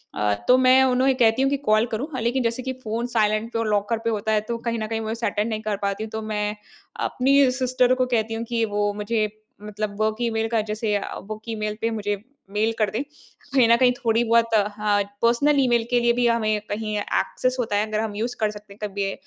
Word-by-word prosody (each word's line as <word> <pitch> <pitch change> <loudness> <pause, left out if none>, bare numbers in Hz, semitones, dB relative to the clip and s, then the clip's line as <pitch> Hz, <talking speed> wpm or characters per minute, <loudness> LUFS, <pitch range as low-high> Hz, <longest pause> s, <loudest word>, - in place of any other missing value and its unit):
अ, 105 0 +1
तो 250 - +7
मैं 260 +1 +6
उन्हें 260 +1 +3
कहती 235 0 +3
हूँ 270 - +3
कि, 280 - 0
"कॉल 220 -4 +2
करूँ?" 230 +6 -2
अ, - - -2
लेकिन 245 +3 0
जैसे 235 +2 -1
कि 260 0 -3
फ़ोन 225 +2 -2
साइलेंट 220 -1 0
पे 230 - 0
और 230 - -1
लॉकर 210 +2 +1
पे 230 - +1
होता 220 -1 -1
है, 215 -1 +2
तो 230 +2 -4
कहीं 230 0 -3
न 215 - -3
कहीं 225 0 -2
मैं 220 0 -3
उसे 230 +1 -3
अटेंड 210 +2 -1
नहीं 215 -1 -3
कर 215 -2 -2
पाती 200 +1 -2
हूँ। 220 - -6
तो 220 - -4
मैं 210 0 -1 0.5
अपनी 275 +1 +4
सिस्टर 255 -1 +3
को 255 0 +1
कहती 225 0 0
हूँ 225 +1 -3
कि 230 -1 0
वो 205 0 +1
मुझे 215 +1 -1 0.3
मतलब 210 0 -5
वर्क 215 0 +1
ईमेल 225 -1 0
का 225 -2 +1
जैसे 215 -1 -1
अ, 205 - -3
वर्क 215 +2 -8
ईमेल 215 -1 -3
पे 230 - +1
मुझे 205 -2 -2 0.3
मेल 215 +2 +1
कर 215 -2 +2
दे। 210 - -3 0.5
कहीं 255 -4 +5
न 235 - +7
कहीं 250 0 +4
थोड़ी 230 -1 +1
बहुत 230 0 +2
अ, 205 -2 +4 0.5
पर्सनल 280 +5 +3
ईमेल 240 -3 +3
के 245 -1 +3
लिए 235 0 +3
भी 245 0 +2
हमें 215 -2 +1
कहीं 215 0 -2
एक्सेस 255 +4 -1
होता 220 -4 -1
है, 210 +1 +1
अगर 215 0 -2
हम 220 -2 -3
यूज़ 235 +4 -2
कर 215 -1 +1
सकते 210 -1 -12
हैं 205 - -21
कभी, 195 0 -2
225 Hz, 245 wpm, -23 LUFS, 210-240 Hz, 0.5 s, तो